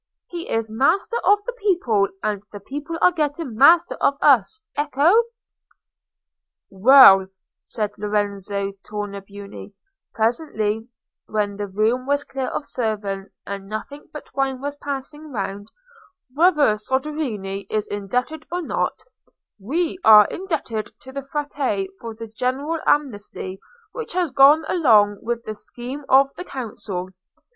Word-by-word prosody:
He 345 Hz, -1 st, -7 dB
is 225 Hz, 0 st, -1 dB
master 320 Hz, -, +1 dB
of 410 Hz, 0 st, +4 dB
the -, -, -4 dB
people, 350 Hz, -, +1 dB, 0.2 s
and 210 Hz, -2 st, -1 dB
the 205 Hz, -, -8 dB
people 295 Hz, +9 st, -6 dB
are 360 Hz, -, +7 dB
getting 300 Hz, -4 st, -2 dB
master 325 Hz, +9 st, +5 dB
of 280 Hz, -, +2 dB
us. 285 Hz, -, +3 dB
Ecco!" 305 Hz, -, +3 dB, 1.5 s
"Well," 195 Hz, -2 st, +8 dB, 0.3 s
said 210 Hz, -2 st, -3 dB
Lorenzo 200 Hz, -1 st, -2 dB
Tornabuoni, 200 Hz, -1 st, -8 dB, 0.4 s
presently, 225 Hz, -2 st, -1 dB, 0.4 s
when 205 Hz, -2 st, -1 dB
the 205 Hz, 0 st, -4 dB
room 220 Hz, +6 st, 0 dB
was 285 Hz, 0 st, +1 dB
clear 270 Hz, -2 st, -4 dB
of 290 Hz, -, -4 dB
servants, 205 Hz, -4 st, -4 dB
and 200 Hz, -1 st, -6 dB
nothing 250 Hz, +7 st, -6 dB
but 300 Hz, -, -11 dB
wine 270 Hz, -1 st, -1 dB
was 285 Hz, +2 st, -4 dB
passing 285 Hz, +2 st, -6 dB
round, 200 Hz, -2 st, -4 dB, 0.7 s
"whether 300 Hz, -8 st, +4 dB
Soderini 220 Hz, -6 st, -3 dB
is 215 Hz, -1 st, -1 dB
indebted 250 Hz, +10 st, -3 dB
or 355 Hz, 0 st, -2 dB
not, -, -, -2 dB, 0.6 s
we 320 Hz, -, -2 dB
are 215 Hz, -1 st, +9 dB
indebted 305 Hz, -, -3 dB
to 265 Hz, -, -11 dB
the 275 Hz, +1 st, -5 dB
Frate 275 Hz, -8 st, -2 dB
for 230 Hz, -1 st, -7 dB
the 225 Hz, +1 st, -7 dB
general 260 Hz, +8 st, -2 dB
amnesty 205 Hz, -8 st, -1 dB, 0.3 s
which 470 Hz, -6 st, -6 dB
has 355 Hz, -4 st, 0 dB
gone 285 Hz, +4 st, +6 dB
along 210 Hz, -, +4 dB
with 235 Hz, 0 st, -3 dB
the 215 Hz, -, -5 dB
scheme 250 Hz, +6 st, -8 dB
of 275 Hz, +1 st, +5 dB
the -, -, -5 dB
Council. 210 Hz, -, -6 dB
250 Hz, 130 wpm, -22 LUFS, 205-295 Hz, 1.5 s, are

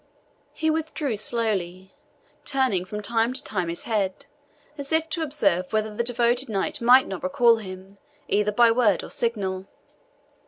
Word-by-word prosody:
He 315 Hz, 0 st, 0 dB
withdrew 310 Hz, -5 st, -2 dB
slowly, 195 Hz, -5 st, -2 dB, 0.5 s
turning 260 Hz, -10 st, 0 dB
from 210 Hz, +2 st, -6 dB
time 230 Hz, +2 st, +1 dB
to 265 Hz, -, -3 dB
time 185 Hz, -5 st, -2 dB
his 170 Hz, -, -4 dB
head, 200 Hz, -5 st, -2 dB, 0.5 s
as 280 Hz, -1 st, -6 dB
if 320 Hz, 0 st, +2 dB
to 335 Hz, -, -2 dB
observe 200 Hz, -, 0 dB
whether 215 Hz, -1 st, -1 dB
the 235 Hz, -, 0 dB
devoted 240 Hz, +1 st, +1 dB
knight 215 Hz, +7 st, -2 dB
might 250 Hz, +3 st, +6 dB
not 190 Hz, -, -5 dB
recall 245 Hz, -5 st, +4 dB
him 190 Hz, -1 st, -10 dB, 0.3 s
either 210 Hz, +1 st, +1 dB
by 235 Hz, +2 st, +5 dB
word 225 Hz, -6 st, +2 dB
or -, -, -9 dB
signal. 195 Hz, -5 st, -2 dB
225 Hz, 155 wpm, -24 LUFS, 195-255 Hz, 0.5 s, might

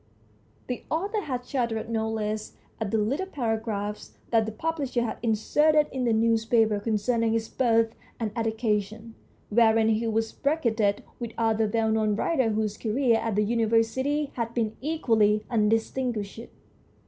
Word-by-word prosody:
The 250 Hz, -, -4 dB
author 400 Hz, +7 st, -1 dB
had 250 Hz, -3 st, -3 dB
shuddered 235 Hz, -4 st, -2 dB
no 220 Hz, -1 st, -1 dB
less 215 Hz, -1 st, -3 dB, 0.3 s
at 220 Hz, -3 st, -2 dB
the 220 Hz, -, +1 dB
little 270 Hz, -, 0 dB
paragraphs 220 Hz, -, -3 dB
that 225 Hz, -2 st, +3 dB
the -, -, -3 dB
publisher 275 Hz, -1 st, -2 dB
had 230 Hz, -, -4 dB
inserted 295 Hz, +7 st, +3 dB
in 260 Hz, -2 st, -2 dB
the 235 Hz, -, +2 dB
newspapers 225 Hz, -1 st, +2 dB
concerning 225 Hz, +1 st, +1 dB
his 225 Hz, -1 st, -1 dB
birth 230 Hz, -3 st, +2 dB, 0.3 s
and 220 Hz, -3 st, -2 dB
education, 220 Hz, -1 st, -2 dB, 0.4 s
wherein 225 Hz, 0 st, +4 dB
he 225 Hz, +1 st, +1 dB
was 225 Hz, 0 st, 0 dB
bracketed 230 Hz, -9 st, 0 dB, 0.2 s
with 235 Hz, -2 st, -5 dB
other 225 Hz, -1 st, +1 dB
well 225 Hz, 0 st, +1 dB
known 215 Hz, -1 st, +1 dB
writers 240 Hz, -4 st, +1 dB
whose 215 Hz, -1 st, -1 dB
careers 230 Hz, 0 st, +2 dB
at 225 Hz, -3 st, -2 dB
the 210 Hz, -, +3 dB
University 235 Hz, +6 st, +1 dB
had 230 Hz, -1 st, -4 dB
been 220 Hz, -3 st, -1 dB
equally 225 Hz, -9 st, +2 dB
undistinguished. 225 Hz, 0 st, 0 dB
225 Hz, 145 wpm, -26 LUFS, 220-245 Hz, 0.4 s, wherein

